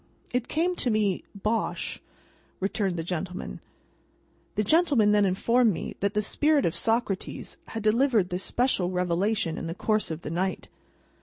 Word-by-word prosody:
"It 245 Hz, -1 st, 0 dB
came 350 Hz, +3 st, 0 dB
to 250 Hz, -, 0 dB
me, 210 Hz, -4 st, +1 dB
Bosh," 215 Hz, +3 st, -2 dB, 0.6 s
returned 195 Hz, -2 st, -1 dB
the 165 Hz, -, -2 dB
gentleman. 180 Hz, +2 st, -4 dB, 1.0 s
The 210 Hz, -, +1 dB
gentleman 280 Hz, -, +4 dB
then 205 Hz, -1 st, +4 dB
informed 230 Hz, +5 st, +3 dB
me -, -, -5 dB
that 200 Hz, +1 st, -1 dB
the 210 Hz, -, +2 dB
spirit 295 Hz, +5 st, +2 dB
of 165 Hz, -, +1 dB
Socrates 225 Hz, -4 st, -1 dB
had 225 Hz, -, -5 dB
delivered 220 Hz, -3 st, +3 dB
this 180 Hz, 0 st, -2 dB
special 240 Hz, -8 st, +1 dB
revelation 180 Hz, 0 st, 0 dB
in 165 Hz, -, -4 dB
the 165 Hz, -, -4 dB
course 215 Hz, +1 st, 0 dB
of 160 Hz, +1 st, -5 dB
the 150 Hz, -, -4 dB
night. 185 Hz, +3 st, -2 dB
210 Hz, 155 wpm, -27 LUFS, 185-230 Hz, 1.0 s, gentleman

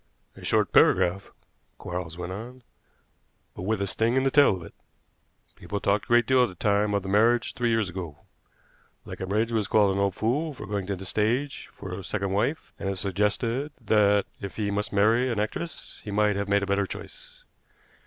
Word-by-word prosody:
"A -, -, -13 dB
short -, -, +1 dB
paragraph," 95 Hz, +3 st, +3 dB, 0.5 s
Quarles 90 Hz, -1 st, -5 dB
went 90 Hz, 0 st, -5 dB
on, 120 Hz, +5 st, -9 dB, 0.9 s
"but -, -, -7 dB
with 100 Hz, +1 st, -1 dB
a -, -, 0 dB
sting 115 Hz, +5 st, +1 dB
in 130 Hz, -, +3 dB
the 135 Hz, -, +2 dB
tail 140 Hz, -8 st, +5 dB
of 90 Hz, -, -8 dB
it. 80 Hz, -, -12 dB, 0.8 s
People 100 Hz, -, -5 dB
talked 100 Hz, +1 st, +1 dB
a -, -, -26 dB
great 120 Hz, 0 st, +4 dB
deal 130 Hz, -1 st, +4 dB
at 125 Hz, -, +3 dB
the 90 Hz, -, -12 dB
time 105 Hz, +2 st, +1 dB
of 100 Hz, -, 0 dB
the -, -, -7 dB
marriage 115 Hz, +5 st, +3 dB
three 120 Hz, -1 st, 0 dB
years 110 Hz, -3 st, +1 dB
ago. 90 Hz, -5 st, -6 dB, 0.9 s
Leconbridge 105 Hz, +5 st, -2 dB
was 110 Hz, -3 st, 0 dB
called 105 Hz, -2 st, +4 dB
an 100 Hz, -, 0 dB
old 100 Hz, -2 st, +1 dB
fool 145 Hz, +7 st, -1 dB
for 130 Hz, -, -8 dB
going 100 Hz, -2 st, -3 dB
to 100 Hz, -, -1 dB
the 95 Hz, +1 st, -9 dB
stage 120 Hz, +9 st, -1 dB
for 95 Hz, -, -8 dB
a 95 Hz, +1 st, -6 dB
second 100 Hz, 0 st, -2 dB
wife, 120 Hz, +11 st, -1 dB
and 95 Hz, -, -2 dB
it -, -, 0 dB
was 95 Hz, -, -7 dB
suggested 110 Hz, -, -1 dB
that, 105 Hz, -3 st, +3 dB, 0.2 s
if 100 Hz, -1 st, -6 dB
he 105 Hz, -2 st, -1 dB
must 105 Hz, +1 st, -2 dB
marry 110 Hz, +5 st, +3 dB
an 115 Hz, -, -1 dB
actress, 135 Hz, +10 st, -4 dB
he -, -, -7 dB
might 105 Hz, 0 st, +2 dB
have 100 Hz, 0 st, -2 dB
made 100 Hz, 0 st, +3 dB
a -, -, 0 dB
better 100 Hz, 0 st, 0 dB
choice. -, -, -10 dB
105 Hz, 205 wpm, -26 LUFS, 100-115 Hz, 0.9 s, tail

